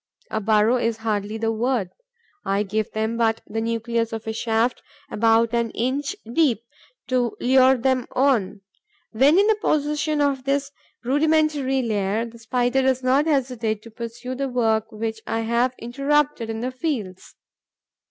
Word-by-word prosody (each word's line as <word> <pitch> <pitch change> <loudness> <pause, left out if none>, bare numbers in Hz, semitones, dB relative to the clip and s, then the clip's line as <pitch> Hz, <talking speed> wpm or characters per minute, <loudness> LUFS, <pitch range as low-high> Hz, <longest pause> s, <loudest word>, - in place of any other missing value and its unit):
A 220 - -1
burrow 215 +3 +3
is 230 -2 -1
hardly 210 0 -1
the 225 0 0
word: 225 -4 -1 0.5
I 195 +1 0
give 215 +1 -2
them 220 +1 -2
but 225 -1 +1
the 225 +1 -3
nucleus 230 0 -1
of 225 -1 -5
a 220 - -3
shaft, 225 +2 0 0.3
about 225 +1 +3
an 235 -1 +1
inch 265 +4 -1 0.2
deep, 255 -8 +2 0.5
to 250 -3 0
lure 260 +1 +5
them 255 0 0
on. 225 -7 +1 0.5
When 270 +9 +4
in 405 +2 +5
possession 300 -1 0
of 280 -2 +1
this 280 0 0 0.3
rudimentary 290 -1 +2
lair, 210 0 0
the 235 0 -12
Spider 245 +3 +1
does 260 -1 +1
not 270 +4 +3
hesitate 245 -7 -1
to 230 - -12
pursue 235 +3 -6
the 270 +1 -2
work 225 -2 0
which 220 0 -4
I 225 - -1
have 235 +3 +1
interrupted 275 +1 0
in 225 0 -4
the 255 +2 -2
fields. 255 - -4
235 Hz, 150 wpm, -23 LUFS, 225-265 Hz, 0.5 s, lure